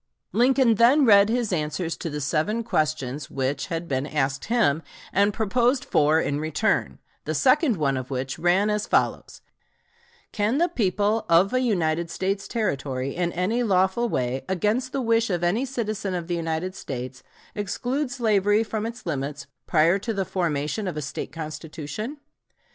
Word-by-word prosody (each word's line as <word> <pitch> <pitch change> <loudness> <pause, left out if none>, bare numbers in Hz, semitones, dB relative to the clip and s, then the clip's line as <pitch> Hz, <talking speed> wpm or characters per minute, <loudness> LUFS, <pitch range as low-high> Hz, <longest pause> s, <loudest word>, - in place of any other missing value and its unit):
Lincoln 255 0 +4
then 250 +7 +5
read 200 -2 +6
his 235 -3 0
answers 160 +1 -2
to 165 - -4
the 150 0 -4
seven 160 +11 0
questions 150 - -1
which, 135 +1 -2
had 165 0 -4
been 135 0 -1
asked 135 -3 -1
him, 210 -10 +2 0.3
and 200 +1 +3
proposed 240 +5 +1
four 155 +2 +3
in 145 -2 -1
return, 155 +8 0 0.3
the - - -2
second 265 - +3
one 140 -3 +1
of 130 -1 -5
which 135 +2 -3
ran 185 +5 +3
as 210 0 -1
follows: - - 0 0.9
"Can 215 +5 0
the 345 +3 +3
people 210 - +1
of 175 +6 +4
a 255 - +3
United 170 -8 0
States 195 +4 -2
Territory, 140 - -2
in 175 -1 0
any 200 +8 0
lawful 195 +2 +2
way, 125 - -1
against 210 +8 0
the 275 -1 -2
wish 230 -1 +2
of 175 -2 -1
any 205 +10 +1
citizen 215 -7 -3
of 175 -2 -3
the 175 +1 -2
United 165 +2 -2
States, 130 -7 -6 0.3
exclude 245 +8 -2
slavery 215 -4 +2
from 220 0 -3
its 235 +1 -9
limits, 140 -3 -3 0.2
prior 170 +4 +3
to 225 +2 -3
the 195 -1 -1
formation 170 +3 -2
of 175 - -4
a - - -2
State 140 - -5
constitution?" 160 - -6
185 Hz, 165 wpm, -25 LUFS, 155-225 Hz, 0.9 s, read